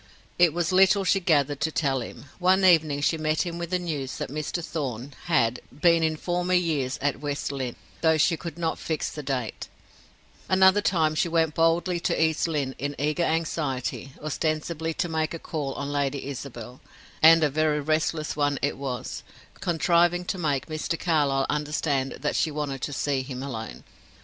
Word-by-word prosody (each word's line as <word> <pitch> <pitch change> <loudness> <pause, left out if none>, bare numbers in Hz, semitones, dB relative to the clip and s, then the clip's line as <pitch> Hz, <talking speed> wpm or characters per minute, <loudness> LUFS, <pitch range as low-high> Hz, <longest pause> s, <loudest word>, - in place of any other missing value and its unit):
It 175 -2 +6
was 170 +1 -1
little 195 +2 +5
she 195 +1 +3
gathered 145 -6 +2
to 160 - +2
tell 135 -4 0
him; 120 - -9
one 190 +1 +4
evening 155 -5 +4
she 160 +2 +1
met 155 0 +1
him 170 -1 -5
with 170 -1 -4
the 180 - +1
news 150 -7 -4
that - - -4
Mr. 155 +3 -3
Thorn 135 -3 -4
had 125 -8 +2
been 165 +4 +3
in 160 -1 +1
former 180 +2 0
years 150 -7 0
at 145 -1 0
West 145 -1 -3
Lynne, 130 -3 -4 0.3
though 160 -1 +4
she 160 +2 +3
could 165 -1 -7
not 165 -1 -2
fix 160 -2 -2
the 150 - -6
date; 130 -5 -3 0.8
another 190 +2 +5
time 160 -6 +2
she 170 +3 0
went 165 -2 +2
boldly 170 +2 +2
to - - -1
East 160 0 +2
Lynne 145 -5 -1
in 145 +1 -3
eager 150 +4 0
anxiety, 155 -5 -2
ostensibly 155 +1 -2
to - - -1
make 160 0 -1
a - - -4
call 150 -4 -4
on 140 0 -4
Lady 140 -1 -1
Isabel 125 -3 -7 0.4
and 165 +1 +8
a 150 - +3
very 155 0 +1
restless 155 +1 -1
one 145 -1 +1
it 145 - 0
was 130 -3 -4 0.4
contriving 175 +1 +2
to 185 - -3
make 145 -5 0
Mr. 155 +1 -3
Carlyle 145 -5 +2
understand 145 -2 -1
that - - -1
she 160 - +2
wanted 145 -3 -4
to 145 - -3
see 140 -1 -1
him 130 -1 -6
alone. 115 -5 -6
155 Hz, 180 wpm, -26 LUFS, 140-170 Hz, 0.8 s, and